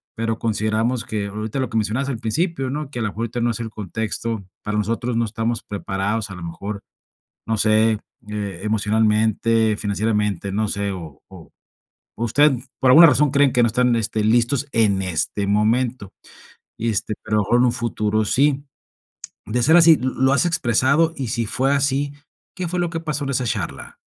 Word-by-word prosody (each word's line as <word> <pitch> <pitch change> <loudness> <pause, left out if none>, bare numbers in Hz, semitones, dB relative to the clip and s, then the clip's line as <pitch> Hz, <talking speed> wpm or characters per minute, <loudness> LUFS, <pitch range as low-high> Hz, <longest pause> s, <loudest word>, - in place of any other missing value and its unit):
pero 115 0 -2
consideramos 110 +2 -1
que 105 -2 -3
ahorita" 110 +5 -4
lo 130 -3 -1
que 115 - -1
mencionabas 115 +6 -1
al 125 -5 -3
principio, 135 - -1
¿no? 145 +1 -4
"Que 120 - -5
a - - -2
lo - - 0
mejor 105 +2 -6
ahorita 115 +1 -3
no 120 - +2
es 115 - -4
el 115 - -4
contexto, 110 +1 -4 0.2
para 105 0 -2
nosotros 115 +3 -1
no 115 - +2
estamos 115 +2 -2
preparados", 100 +1 -3
a 95 - -8
lo 85 - -9
mejor, 100 +5 -6 0.6
no 110 - +1
sé, 110 0 +3 0.3
eh, 100 -4 -5
emocionalmente, 110 +1 +1
financieramente, 105 -2 -1
no 105 +2 0
sé, 100 0 -2
o 80 -7 -9
o - - -13 0.7
o 115 - -3
usted, 145 +6 +4 0.3
por 130 -1 +5
alguna 165 +4 +9
razón 145 -2 +3
creen 140 -1 +4
que 120 - +3
no 115 - +4
están, 125 +1 +2
este, 110 -1 -1
listos 120 +5 +2
en 105 -4 +2
este 95 +2 -2
momento, 110 +1 0 0.7
y, 115 - -2
este, 110 0 -1
pero 110 -1 -1
a - - +4
lo - - 0
mejor 120 +4 +2
en 125 - +4
un 120 - +2
futuro 110 -2 -1
sí. 140 +4 +2 0.8
De 120 +4 -1
ser 160 +7 +5
así, 165 -2 +7
¿lo 130 0 -2
lo 130 +1 +2
has 140 +5 +3
expresado? 145 +1 +2
Y 135 - -3
si 115 0 -1
fue 135 +5 0
así, 140 0 0 0.4
¿qué 180 -3 -4
fue 180 - -3
lo 175 - -1
que 165 -1 -4
pasó 150 -2 -3
en 140 - -3
esa 125 -1 0
charla? 115 - -4
115 Hz, 195 wpm, -21 LUFS, 105-130 Hz, 0.8 s, alguna